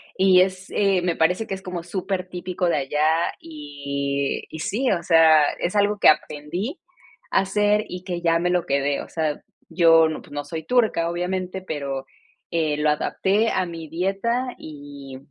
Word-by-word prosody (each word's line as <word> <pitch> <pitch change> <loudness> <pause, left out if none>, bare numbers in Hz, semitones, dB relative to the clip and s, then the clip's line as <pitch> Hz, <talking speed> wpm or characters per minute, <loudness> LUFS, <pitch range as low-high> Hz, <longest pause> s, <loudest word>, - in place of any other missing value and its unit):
y 185 -1 +5
es, 185 0 -1
eh, 195 -3 +2
me 175 -1 0
parece 180 +7 +1
que 195 - -3
es 190 - -10
como 180 -2 -5
supertipico 185 -1 -3
de - - +1
allá, 150 +4 +1
y 140 -2 -3
y 160 - -8
sí, 245 +10 0
o 180 -4 0
sea, 160 -3 +6
es 175 - -2
algo 205 0 +2
que - - +5
aprendí 165 - -1 0.5
a - - +4
hacer 205 +2 +1
y 180 0 -7
que 175 -2 -4
ya 165 -1 +3
me 175 +1 0
lo 180 -1 +1
quedé, 140 0 0
o - - -10
sea, 155 -2 -2 0.3
yo 165 -1 +5
no, 155 - -5
pues - - -18
no 145 0 -4
soy 160 +2 -6
turca 220 -9 +2
obviamente, 185 +1 -3
pero, 140 -5 -4 0.5
eh, 160 -3 0
lo 150 0 +2
adapté 200 +8 +1
a 185 - 0
mi 165 -2 -8
dieta, 195 - -1
y 145 -3 -10
170 Hz, 175 wpm, -23 LUFS, 150-190 Hz, 0.5 s, sea